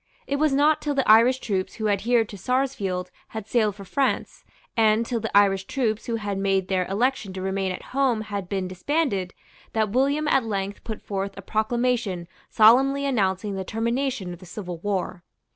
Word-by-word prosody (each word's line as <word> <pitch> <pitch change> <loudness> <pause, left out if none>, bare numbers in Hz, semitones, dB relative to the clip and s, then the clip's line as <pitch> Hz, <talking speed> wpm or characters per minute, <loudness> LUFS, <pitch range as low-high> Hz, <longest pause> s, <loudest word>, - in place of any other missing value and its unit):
It 280 - -1
was 305 0 +2
not 300 +3 +3
till 290 -1 -1
the 270 - +1
Irish 230 +4 +6
troops 195 -7 -3
who 220 -2 -2
adhered 225 +3 +2
to - - -8
Sarsfield 195 -5 -1 0.3
had 220 - -5
sailed 215 -4 +1
for 200 -1 -10
France, 275 +7 -1 0.3
and 220 0 +3
till 235 0 -2
the 220 -2 0
Irish 195 -1 +4
troops 225 -4 -1
who 230 - -1
had 205 -3 -3
made 195 -1 +1
their 185 -2 +1
election 215 0 0
to 190 - -5
remain 190 0 -1
at 185 - -6
home 260 -5 +2
had 200 -4 -5
been 190 -2 -2
disbanded, 195 - -1 0.4
that 220 -2 +1
William 280 +5 +1
at 270 -4 +3
length 200 -2 -3
put 220 -2 -6
forth 195 0 -4
a 195 - -8
proclamation 220 -4 -1 0.2
solemnly 270 +6 +5
announcing 200 -5 0
the 190 0 -3
termination 230 -2 -2
of 175 - -11
the 185 - -13
civil 180 -2 -6
war. 185 -2 -3
215 Hz, 185 wpm, -24 LUFS, 195-250 Hz, 0.4 s, Irish